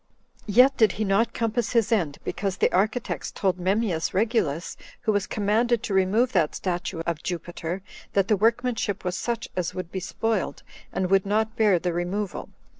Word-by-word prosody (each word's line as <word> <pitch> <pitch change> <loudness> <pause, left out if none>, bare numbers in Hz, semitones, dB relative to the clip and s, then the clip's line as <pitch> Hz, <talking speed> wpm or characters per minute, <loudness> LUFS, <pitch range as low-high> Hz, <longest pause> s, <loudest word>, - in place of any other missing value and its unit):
Yet 250 +6 +5
did 220 -6 +3
not 200 +4 +3
he - - -29
compass 230 0 -1
his 230 -1 +2
end, 165 -10 +1
because 195 -2 -2
the - - +2
architects 215 +6 0
told 190 -2 -1
Memmius 185 -3 0
Regulus, 190 - 0 0.3
who 220 - +1
was 205 -2 0
commanded 220 +3 +1
to 200 - -3
remove 200 +6 +3
that 170 -8 +1
statue 175 -2 -3
of 170 -2 -2
Jupiter, 175 +1 -4 0.3
that 195 -1 +2
the 215 - +4
workmanship 225 -2 0
was 180 0 -1
such 235 +3 -2
as 180 -2 -2
would 185 -2 -5
be 190 - -3
spoiled, 215 +2 -2 0.3
and 185 0 -1
would 195 0 +4
not 220 +2 +1
bear 210 -5 +4
the 175 0 -2
removal. 180 +3 -3
200 Hz, 175 wpm, -25 LUFS, 180-225 Hz, 0.3 s, Yet